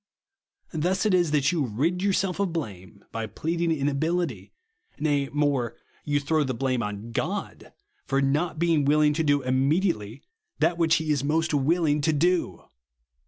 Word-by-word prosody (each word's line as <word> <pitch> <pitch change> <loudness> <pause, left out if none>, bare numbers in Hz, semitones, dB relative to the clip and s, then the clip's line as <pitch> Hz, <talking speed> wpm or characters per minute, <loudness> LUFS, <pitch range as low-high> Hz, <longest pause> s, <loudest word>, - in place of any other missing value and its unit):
Thus 180 +5 0
it 210 - +3
is 175 -3 +3
that 145 -2 +2
you 165 -4 0
rid 145 +10 -1
yourself 195 -1 0
of 200 -3 0
blame 100 - -6
by 115 -1 -4
pleading 165 - -2
inability; 160 +4 -1 0.5
nay 145 -3 0
more, 140 -5 0 0.3
vou 145 0 +2
throw 155 +2 +1
the 130 -3 -2
blame 130 0 0
on 105 +1 -5
God, - - -4 0.4
for 135 - +1
not 150 +5 0
bein^^ 165 -2 +2
willing 150 0 +4
to 160 - 0
do 145 -2 +2
immediately 135 - 0 0.3
that 165 +2 +1
v/hich 165 -1 +4
he 160 -2 -1
is 140 -3 0
most 160 +2 0
willing 150 +1 +2
to 160 +2 +2
do. 175 +4 0
150 Hz, 160 wpm, -26 LUFS, 135-165 Hz, 0.5 s, willing